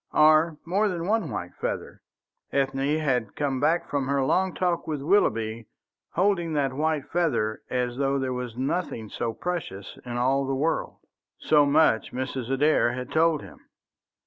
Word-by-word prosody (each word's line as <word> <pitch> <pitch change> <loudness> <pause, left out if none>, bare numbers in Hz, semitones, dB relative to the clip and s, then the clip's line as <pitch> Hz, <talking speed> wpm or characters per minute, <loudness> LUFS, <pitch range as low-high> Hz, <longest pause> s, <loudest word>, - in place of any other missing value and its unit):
Or 155 +1 +5
more 195 +5 +2
than 175 -4 -3
one 220 +3 +1
white 90 - -5
feather? - - -5 0.5
Ethne 135 +2 +1
had 125 -8 -1
come 140 -3 -1
back 165 +4 +1
from 140 -2 -1
her 140 -1 +1
long 185 +7 +1
talk 175 -2 0
with 155 -2 -2
Willoughby 115 - +1 0.5
holding 175 -3 +1
that 140 -3 0
white 150 0 -1
feather 125 -11 0
as 125 -1 -1
though 140 0 +1
there 130 -1 -1
was 125 -2 -5
nothing 130 - -2
so 115 +2 -2
precious 115 - -5
in 120 -1 -5
all 135 +2 +1
the 135 - 0
world. 155 +5 -1 0.4
So 150 -2 +4
much 140 -6 +3
Mrs. 130 -1 -4
Adair 135 -2 +3
had 125 0 -6
told 160 -1 +2
him. - - -13
140 Hz, 160 wpm, -26 LUFS, 125-165 Hz, 0.5 s, Or